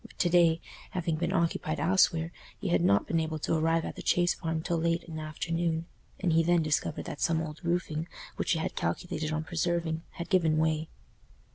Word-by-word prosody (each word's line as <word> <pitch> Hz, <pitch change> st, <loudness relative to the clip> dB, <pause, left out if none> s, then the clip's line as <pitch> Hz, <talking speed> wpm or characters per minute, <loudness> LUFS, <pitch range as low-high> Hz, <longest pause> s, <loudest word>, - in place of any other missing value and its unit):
But -, -, -15 dB
to 175 Hz, -, +2 dB
day, 170 Hz, -2 st, +4 dB, 0.3 s
having 170 Hz, -3 st, -1 dB
been 170 Hz, +2 st, -1 dB
occupied 165 Hz, -4 st, 0 dB
elsewhere, 165 Hz, 0 st, +3 dB, 0.3 s
he -, -, -2 dB
had 90 Hz, -, +3 dB
not 100 Hz, +3 st, +4 dB
been 165 Hz, -, +1 dB
able 160 Hz, -1 st, -2 dB
to 155 Hz, -, -1 dB
arrive 165 Hz, +1 st, +2 dB
at -, -, -5 dB
the -, -, -7 dB
Chase 175 Hz, 0 st, +3 dB
Farm 160 Hz, -2 st, -3 dB
till 170 Hz, -1 st, 0 dB
late 170 Hz, +1 st, +1 dB
in 160 Hz, -2 st, -7 dB
the -, -, -4 dB
afternoon, 165 Hz, +1 st, -1 dB, 0.3 s
and 175 Hz, -4 st, +1 dB
he 165 Hz, -, +5 dB
then 170 Hz, 0 st, +3 dB
discovered 155 Hz, 0 st, -1 dB
that 145 Hz, -, -6 dB
some 165 Hz, -2 st, +2 dB
old 155 Hz, +1 st, -6 dB
roofing, 170 Hz, -2 st, -1 dB, 0.3 s
which -, -, +1 dB
he -, -, 0 dB
had 160 Hz, -, -3 dB
calculated 155 Hz, -, -2 dB
on 155 Hz, 0 st, -1 dB
preserving, 170 Hz, -1 st, -1 dB
had 170 Hz, -, -6 dB
given 165 Hz, -5 st, +3 dB
way. 155 Hz, 0 st, +1 dB
165 Hz, 210 wpm, -29 LUFS, 155-170 Hz, 0.3 s, he